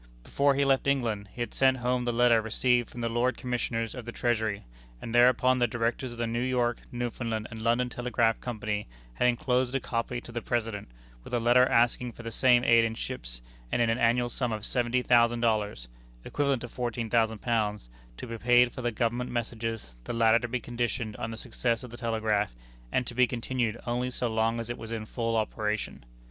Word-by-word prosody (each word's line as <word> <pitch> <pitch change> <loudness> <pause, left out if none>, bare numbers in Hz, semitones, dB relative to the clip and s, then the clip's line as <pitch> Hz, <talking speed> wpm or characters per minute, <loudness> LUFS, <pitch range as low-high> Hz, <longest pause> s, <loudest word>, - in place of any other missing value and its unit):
Before 140 - +2
he 140 0 +2
left 135 0 +2
England, 115 -7 0
he 120 - -8
had 120 - -3
sent 130 -1 +3
home 125 0 0
the 120 - +1
letter 120 -1 +4
received 120 +2 +1
from 120 - -8
the 115 - 0
Lords 120 +2 +1
Commissioners 120 -3 -2
of 125 - -7
the 120 - -6
Treasury; 110 -4 -1 0.3
and 115 - -7
thereupon 125 +1 +5
the 120 - +3
Directors 120 +2 -2
of - - -11
the 120 - -1
New 115 +1 -1
York, 125 -2 0
Newfoundland, 120 -2 -3
and 110 0 -7
London 120 +2 +2
Telegraph 120 -2 0
Company 110 -3 -3 0.3
had 125 - +2
inclosed 125 0 +1
a - - +2
copy 120 0 -2
to 120 - -11
the 120 0 -4
President, 115 -4 -2 0.4
with - - -4
a - - +2
letter 120 +2 +5
asking 120 +1 +2
for 120 - -11
the 115 - -5
same 125 0 +4
aid 115 -2 +5
in 115 0 -1
ships, - - -5 0.3
and - - +1
in 115 -1 +3
an 115 - -1
annual 120 +1 +3
sum 120 0 -1
of 110 -1 -4
$70,000, 120 - +2 0.4
[equivalent 140 -4 0
to - - -4
£14,000,] 115 - -1 0.3
to - - -6
be 115 -1 -6
paid 120 +1 +5
for 130 - -7
the 120 -1 0
government 120 +2 -1
messages, 115 - -4
the - - -4
latter 115 0 +4
to 120 - -4
be 125 +1 -2
conditioned 120 -2 -3
on - - -4
the 115 - -6
success 115 +1 -2
of 125 - -9
the - - -8
telegraph, 110 - 0 0.4
and 130 - +1
to 120 - -6
be 125 +1 +4
continued 120 -1 -2
only 125 +1 -1
so 125 0 0
long 115 +1 0
as 115 - -4
it 120 - -5
was 115 0 -8
in 110 -2 -4
full 115 0 -2
operation. 110 - -2
120 Hz, 205 wpm, -28 LUFS, 115-125 Hz, 0.4 s, thereupon